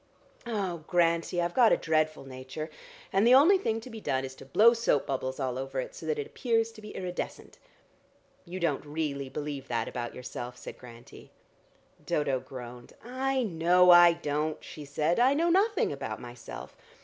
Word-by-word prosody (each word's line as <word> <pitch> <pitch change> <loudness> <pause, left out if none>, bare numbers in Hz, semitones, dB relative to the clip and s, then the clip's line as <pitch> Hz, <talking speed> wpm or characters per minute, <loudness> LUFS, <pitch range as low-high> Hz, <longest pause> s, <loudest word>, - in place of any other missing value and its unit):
Oh, 190 -8 -3
Grantie, 170 0 +1
I've 175 0 0
got 240 -3 +5
a - - +5
dreadful 155 -2 0
nature, 130 +4 -7 0.4
and 195 - +4
the 250 - +8
only 350 +9 +6
thing 225 - -1
to 255 - -10
be 225 -1 -8
done 130 -6 -1
is 130 - -8
to - - -12
blow 220 - +6
soap 230 - +1
bubbles 130 0 -3
all 130 -2 -2
over 135 0 -4
it, 130 - -5
so 160 - -9
that 155 - 0
it 145 - -3
appears 230 -3 0
to 225 -1 -14
be 210 - -10
iridescent." 180 -1 -6 0.8
"You 180 +1 -7
don't 165 -6 0
really 145 -3 -3
believe 145 -1 -5
that 120 - -1
about 120 -1 -5
yourself," 125 0 -7
said - - -10
Grantie. 120 -1 -13 0.7
Dodo 140 -3 0
groaned. 125 -2 -10
"I 260 +2 -1
know 180 -1 +4
I 175 -1 +8
don't," 155 -1 -2
she 150 - -9
said. 150 +6 0
"I 260 +3 +4
know 335 +3 +2
nothing 400 +3 +2
about 110 -6 -5
myself. 120 - -9
155 Hz, 180 wpm, -29 LUFS, 135-215 Hz, 0.8 s, the